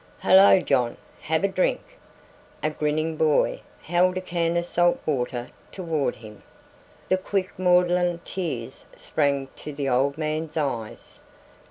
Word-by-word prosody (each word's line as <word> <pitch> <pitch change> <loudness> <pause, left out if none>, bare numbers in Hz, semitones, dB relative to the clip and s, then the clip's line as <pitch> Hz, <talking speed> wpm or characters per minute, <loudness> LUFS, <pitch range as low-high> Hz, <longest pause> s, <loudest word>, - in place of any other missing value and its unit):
"Halloo, 190 -1 +6
John, 120 -2 +1 0.2
have 160 +2 -1
a - - +4
drink?" 190 -1 0 0.8
A 155 - +1
grinning 155 +1 -1
boy 155 -2 +2 0.2
held 180 +2 +2
a - - -2
can 170 -2 -1
of 170 - -1
salt 175 0 +2
water 125 -4 -2 0.2
toward 165 -6 -2
him. 105 -2 -13 0.7
The 185 - +2
quick 185 0 -2
maudlin 180 -1 +3
tears 130 -10 -5
sprang 140 -2 -1
to 150 - -7
the 140 -1 -3
old 135 +3 +1
man's 155 0 -3
eyes. 120 -8 -4
160 Hz, 135 wpm, -24 LUFS, 140-180 Hz, 0.8 s, Halloo